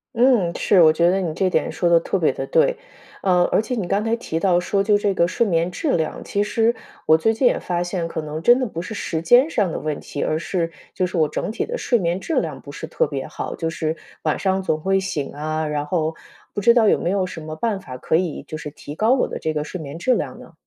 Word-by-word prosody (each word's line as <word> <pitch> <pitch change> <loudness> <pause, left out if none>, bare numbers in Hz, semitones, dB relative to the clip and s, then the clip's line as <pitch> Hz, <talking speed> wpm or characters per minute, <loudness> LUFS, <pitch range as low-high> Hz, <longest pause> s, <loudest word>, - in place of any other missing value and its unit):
嗯， 235 -9 +3
是， 195 - +3
我 155 -2 +7
觉 170 +2 +3
得 190 +1 +2
你 170 -4 -2
这 185 +2 +1
点 - - 0
说 175 - 0
的 170 -1 +6
特 185 - -1
别 160 - +3
地 - - -5
对。 - - +3 0.4
啊， 180 -2 +3
而 - - +5
且 250 - -4
你 205 -7 -2
刚 200 +3 +1
才 225 +1 +1
提 160 -8 -4
到 175 -1 +3
说 195 +2 0
就 210 0 +3
这 205 -1 +1
个 170 - +3
睡 210 - +1
眠 170 0 +1
质 290 - -1
量， 160 - -3
其 205 0 0
实 225 +2 +1 0.3
我 160 - +7
最 225 +7 +2
近 245 +3 +3
也 - - +2
发 175 -1 -2
现 175 -1 -2
可 160 - -4
能 155 0 -5
真 240 +2 +6
的 255 - 0
不 170 - -6
是 205 +6 -5
时 165 -5 -3
间 250 - +6
上 200 - 0
的 - - -3
问 155 -2 -3
题， 145 - -6
而 155 - 0
是 170 0 -2 0.2
就 185 -1 0
是 180 - -4
我 155 - +3
整 - - -3
体 220 - -2
的 485 +1 -4
睡 240 - +2
眠 175 -1 -1
质 325 - 0
量 - - -5
不 - - -10
是 - - -7
特 485 - 0
别 - - -4
好， - - -5
就 165 -1 -2
是 160 -1 -2 0.3
晚 155 - +1
上 190 0 0
总 155 -4 -1
会 195 +2 +2
醒 175 -7 -3
啊， 155 +2 -2
然 150 -1 -2
后 160 -1 0 0.4
不 - - -2
知 235 +3 +6
道 225 -3 +5
有 - - +3
没 175 - -1
有 195 -1 +1
什 180 - -7
么 155 0 -6
办 205 +3 -1
法 130 -8 -9
可 160 - 0
以 165 -4 -1
就 155 - -6
是 150 -1 -6
提 145 0 -10
高 220 +9 +3
我 265 - +1
的 - - -6
这 160 - -2
个 150 -1 -1
睡 180 +4 -7
眠 145 +2 -7
质 255 +9 +2
量 - - -3
呢？ - - -14
180 Hz, 295 characters per minute, -22 LUFS, 160-210 Hz, 0.4 s, 我